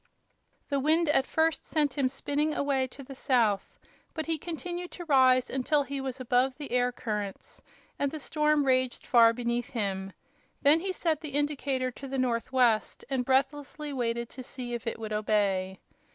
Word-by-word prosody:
The 280 -1 +1
wind 315 +3 +2
at 270 -3 +3
first 320 -1 +1
sent 295 -4 0
him 270 -3 +1
spinning 290 +3 -1
away 275 -2 +1
to 275 +2 -12
the 270 - -10
south, 230 -7 +1 0.4
but 315 -1 -3
he 325 -1 -1
continued 350 +2 -5
to 350 - -7
rise 260 -4 +5
until 285 +3 +1
he 280 0 -4
was 265 -1 -4
above 255 +1 +1
the 290 -2 -7
air 250 0 +2
currents, 210 -5 -5 0.4
and 280 - +1
the 310 +2 -6
storm 300 0 +1
raged 255 -1 +1
far 230 -2 +6
beneath 240 0 -2
him. 195 -4 -3 0.5
Then 295 +3 +6
he 380 +3 -2
set 325 -4 -1
the 300 -4 -6
indicator 280 -3 0
to 275 +3 -9
the 270 0 -3
northwest 245 -2 +1
and 260 -2 +1
breathlessly 285 +3 -1
waited 235 -2 -1
to 260 - -9
see 250 -1 -6
if 240 0 -5
it - - -2
would 215 -1 -5
obey. 200 -3 0
265 Hz, 175 wpm, -29 LUFS, 240-295 Hz, 0.5 s, far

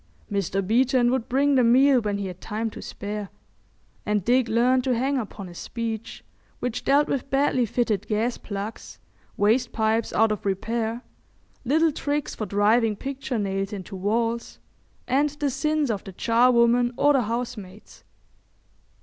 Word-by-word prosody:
Mr. 195 -1 -1
Beeton 245 +3 +3
would 260 -3 -1
bring 280 +3 +2
the 255 -2 +4
meal 255 +2 +5
when 205 -2 -2
he 200 - -3
had 185 -1 -7
time 220 +1 -3
to - - -9
spare, 205 -1 -6 0.7
and 210 -3 -1
Dick 245 0 +3
learned 245 +3 +2
to 255 -1 +1
hang 270 +2 0
upon 210 -3 -7
his 175 -1 -10
speech, 230 -2 -5 0.4
which 245 -2 -3
dealt 285 +2 +3
with 275 0 -2
badly 270 -3 +2
fitted 215 -3 -1
gas 225 +3 0
plugs, 205 +1 -7 0.4
waste 230 +4 +2
pipes 220 0 0
out 225 0 +3
of 210 - -3
repair, 225 +4 -2 0.6
little 315 +5 +3
tricks 290 0 -2
for 215 - -5
driving 210 +3 +2
picture 265 +1 -4
nails 195 -1 -2
into 195 -1 -7
walls, 230 +4 -1 0.5
and 280 +4 +2
the 290 -2 0
sins 305 0 0
of 200 -3 -3
the 195 - -9
charwoman 240 +2 +3
or 290 0 +4
the 270 - +3
housemaids. 220 -4 -6
230 Hz, 155 wpm, -25 LUFS, 210-255 Hz, 0.7 s, meal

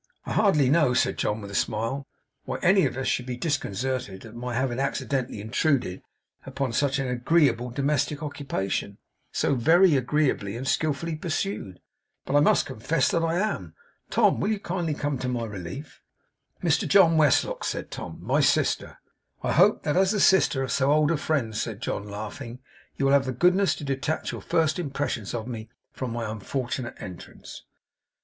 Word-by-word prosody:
I - - -3
hardly 190 -11 +4
know,' 140 -3 +3
said - - +1
John, 105 +1 -1
with 100 -1 -8
a - - -9
smile, 115 +7 -1 0.4
'why - - -3
any 190 +1 +5
of - - -6
us 135 - -2
should 125 - -1
be 125 -1 -4
disconcerted 125 - -2
at 110 - -11
my 120 0 -5
having 130 0 -1
accidentally 135 -3 -2
intruded 110 - 0 0.4
upon 135 -4 -3
such 140 +2 +1
an 135 -1 -1
agreeable 125 0 +2
domestic 145 +3 -1
occupation, 100 -9 -3 0.3
so - - +1
very 165 +7 +5
agreeably 130 -6 0
and 130 +2 -5
skillfully 155 +2 0
pursued; 155 - -3 0.5
but 140 - -1
I - - +7
must 145 - +4
confess 130 +6 0
that 165 - +1
I 165 0 +1
am. 210 +4 -2 0.3
Tom, - - +3
will 200 - 0
you 215 -2 0
kindly 170 -5 -2
come 145 -3 -2
to 125 - -2
my 120 -2 -2
relief?' 105 - -8 0.6
'Mr 165 -3 +2
John 185 -5 +6
Westlock,' 160 - +3
said - - -3
Tom. - - -7
'My - - +1
sister.' - - +1 0.5
'I - - 0
hope 210 - +4
that, 150 +2 0
as 190 0 +4
the 210 - 0
sister 175 -8 +4
of 130 - -3
so 135 +2 +2
old 155 +1 +3
a 165 - +1
friend,' 140 -7 -1
said 110 -2 -3
John, 105 -3 -4
laughing 110 +4 -7 0.4
'you 135 - -1
will 135 - +4
have 140 -1 +4
the 130 - -2
goodness 180 +7 +3
to - - -9
detach 140 +3 -2
your - - -6
first 165 0 +1
impressions 135 - -3
of 115 0 -4
me 110 -3 -6 0.2
from 130 -3 -4
my 115 -1 -3
unfortunate 120 +3 -4
entrance. 90 -2 -10
135 Hz, 180 wpm, -26 LUFS, 120-155 Hz, 0.6 s, I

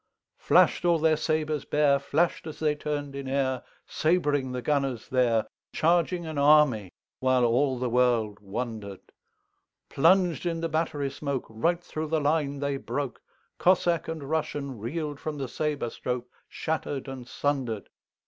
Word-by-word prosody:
Flash'd - - +4
all 170 -1 +4
their 160 0 +3
sabres 155 -1 -1
bare, 145 -2 +3
Flash'd 160 +4 0
as 155 - -7
they 155 -1 +1
turn'd 145 -1 -4
in 140 -1 -5
airSabring 140 +2 0
the 125 -1 -4
gunners 135 -6 0
there, 120 -4 +2 0.3
Charging 170 +1 +2
an 155 -2 -3
army, 140 -10 +4 0.3
whileAll 130 +1 +2
the 125 - -1
world 120 -4 +2
wonder'd:Plunged 120 - -2
in 165 -1 -1
the 165 - -1
battery 150 -3 -1
smokeRight 140 +4 -2
thro' 155 -2 -4
the 160 +1 +1
line 145 -1 0
they 140 -1 -1
broke; 140 -1 -4 0.4
Cossack 175 -2 +3
and 160 -2 -4
RussianReel'd 145 -1 -3
from 155 -1 -4
the 135 -2 -3
sabre 145 -3 -2
strokeShatter'd 130 +3 -4
and 130 -2 -7
sunder'd. 120 -5 -2
145 Hz, 130 wpm, -27 LUFS, 125-155 Hz, 0.4 s, Flash'd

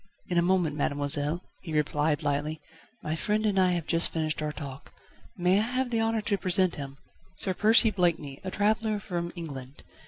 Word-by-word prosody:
"In 175 -1 +2
a - - +4
moment, 175 -4 +2
mademoiselle," 145 +3 0 0.2
he 160 - -7
replied 150 +1 +1
lightly, 145 +2 -1 0.4
"my 155 +1 -2
friend 210 +6 0
and 200 -2 +2
I 185 -1 +4
have 170 -3 -2
just 165 0 +2
finished 155 -1 -2
our 150 0 -1
talk. 140 -3 -9 0.5
May 180 +2 +3
I - - +3
have 250 +2 -1
the 225 -1 +1
honour 225 0 +1
to 205 -1 -1
present 185 -1 +3
him? 140 -1 -7 0.4
Sir 190 0 -1
Percy 220 +3 +5
Blakeney, 165 -7 0
a 190 - -3
traveller 215 +2 +1
from 175 -4 -4
England. 140 -5 -8
175 Hz, 185 wpm, -28 LUFS, 150-200 Hz, 0.5 s, Percy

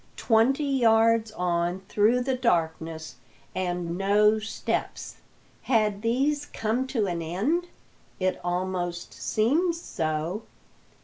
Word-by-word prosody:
Twenty 245 +6 +3
yards 230 -4 +3
on 175 0 -1
through 220 +5 +3
the 260 +1 0
darkness, 160 - -1 0.4
and 175 -1 -2
no 210 +2 +4
steps. 215 +1 -4 0.4
Had 215 -4 +1
these 275 +6 0
come 230 +4 -1
to 230 -5 0
an 175 -3 -2
end? 225 - -1 0.5
It 185 0 0
almost 175 -1 -2
seemed 310 +11 +1
so. 160 - -3
210 Hz, 105 wpm, -26 LUFS, 175-245 Hz, 0.5 s, no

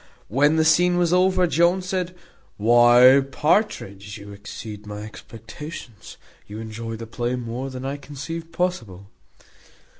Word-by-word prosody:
When 145 +7 +3
the 160 0 +2
scene 175 +2 +4
was 175 -1 +2
over 185 0 +3
Jones 175 +2 +2
said, 185 -1 -2 0.4
"Why, 120 +4 +6
Partridge, 105 - -1
you 100 0 -11
exceed 105 +1 -9
my 105 0 -6
expectations. 115 +2 -10 0.3
You 105 - -8
enjoy 115 +1 -6
the 115 +1 -7
play 120 +2 -3
more 125 +2 -5
than 130 0 -7
I 140 +1 -3
conceived 150 +4 -7
possible." 130 - -3
130 Hz, 130 wpm, -23 LUFS, 110-165 Hz, 0.4 s, Why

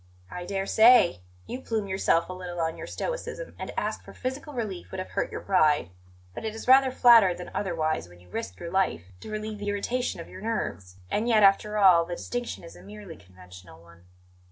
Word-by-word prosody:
"I 180 0 -6
dare 195 +1 -2
say. 220 - +6 0.3
You 255 - -6
plume 220 -5 -2
yourself 190 -3 +1
a 185 - -6
little 180 -1 -7
on 160 -1 -1
your - - -8
stoicism, - - -5
and - - -5
to - - -3
ask - - -3
for - - -13
physical 265 +4 -5
relief 210 -7 -4
would 190 - -7
have 185 - -6
hurt - - -2
your - - -5
pride; 155 - +2 0.4
but - - -7
it 220 -1 -4
is 225 - -8
rather 265 +1 +7
flattered 230 -8 +6
than 180 - -8
otherwise 155 - -2
when 90 0 -17
you 90 - -20
risk 90 +1 -6
your 170 - -6
life 95 - 0
to - - -10
relieve 215 0 -5
the 205 0 -3
irritation 235 +3 -2
of 170 - -8
your 185 - -11
nerves. 105 - -4 0.2
And 215 +3 0
yet, 220 -3 +4
after 210 +2 +4
all, 185 -5 +6
the 175 +1 -5
distinction 245 +3 -5
is 170 - -11
a - - -14
merely 205 -5 -10
conventional 90 -2 -15
one." 85 +1 -19
190 Hz, 215 wpm, -27 LUFS, 160-220 Hz, 0.4 s, rather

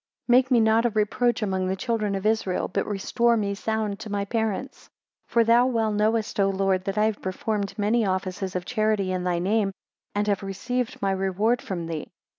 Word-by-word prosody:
23 245 - +4
Make 260 0 -2
me 250 -3 +5
not 220 +1 +4
a - - 0
reproach 225 +2 +1
among 190 -2 -1
the 190 - 0
children 215 -2 -1
of 195 +1 -4
Israel, 215 -4 +1
but - - -2
restore 235 +4 +1
me 200 -2 -1
sound 215 0 -2
to 220 - -7
my 200 -1 -1
parents. 225 +3 -3 0.4
24 - - -29
For 235 - +4
thou 235 +2 +5
well 225 -4 +1
knowest, 215 +1 0
O 195 0 +4
Lord, 190 -1 0
that 195 +1 -3
I 210 - +4
have 215 -1 -1
performed 200 +2 -3
many 220 +3 +2
offices 185 -1 -2
of 180 -1 -2
charity 215 -3 0
in 185 -1 -2
thy 180 -1 +1
name, 200 +3 +1 0.4
and 205 0 +1
have 200 -2 +1
received 225 +5 -3
my 195 - +2
reward 195 +5 +1
from 175 -3 -4
thee. 165 -2 -5
210 Hz, 210 wpm, -25 LUFS, 195-225 Hz, 0.4 s, me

